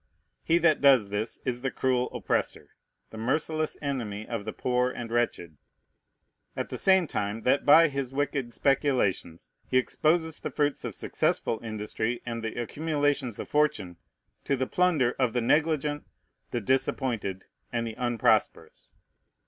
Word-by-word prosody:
He 165 - +3
that 170 -3 +3
does 130 -8 +5
this 105 +3 -2
is 125 -2 -2
the 135 - -1
cruel 125 -1 0
oppressor, - - -2 0.4
the 110 - -8
merciless 155 +6 -1
enemy 110 -7 -3
of 115 -4 -4
the 110 - -3
poor 125 +2 0
and 120 -2 -6
wretched; 90 -10 -1 1.0
at - - -3
the - - -4
same 190 -2 +4
time 105 -5 -3
that 135 +3 +2
by 165 +3 +8
his 140 -3 -3
wicked 135 -3 -2
speculations 100 - 0 0.2
he 130 - +2
exposes 160 +5 +1
the - - -4
fruits 145 -1 -1
of - - -5
successful 115 - -1
industry 110 +2 -3
and 115 -1 -4
the 110 +2 -4
accumulations 145 -2 -1
of - - -6
fortune 105 - 0 0.5
to 140 - 0
the 130 0 -1
plunder 155 -8 +2
of 125 -3 +1
the 125 - +1
negligent, 150 +2 +1 0.5
the 120 - -2
disappointed, 115 -5 -1 0.3
and 115 -1 -1
the 115 - -4
unprosperous. 120 -2 0
125 Hz, 150 wpm, -27 LUFS, 115-145 Hz, 1.0 s, by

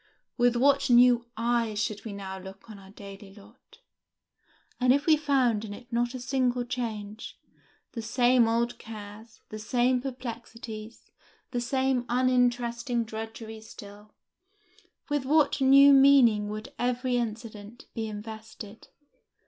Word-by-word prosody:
With 245 -1 +2
what 275 +3 +3
new 240 -1 +5
eyes 230 -2 0
should 210 0 -3
we 220 - -5
now 190 -1 -7
look 190 +2 -12
on 205 - -11
our 190 0 -15
daily 200 -1 -12
lot! 215 +4 -19 1.0
and 250 0 +3
if 285 +2 +2
we 320 - +5
found 265 -7 +1
in 205 -2 -7
it 240 +2 -14
not 240 +2 0
a - - -5
single 250 -1 -1
change, 220 -4 -6 0.5
the 230 - -6
same 240 +1 +3
old 235 +1 -1
cares, 220 +1 -11
the 215 - -7
same 245 +3 +1
perplexities, 235 -3 -8 0.4
the 245 - -2
same 260 0 0
uninteresting 245 -1 +1
drudgeries 220 0 -8
still, 205 +1 -13 0.9
with 290 -3 -1
what 290 0 +2
new 275 +1 +7
meaning 260 -7 +5
would 215 +1 -7
every 250 0 0
incident 225 -1 -6
be 225 -1 -4
invested! 220 0 -9
235 Hz, 130 wpm, -27 LUFS, 215-250 Hz, 1.0 s, new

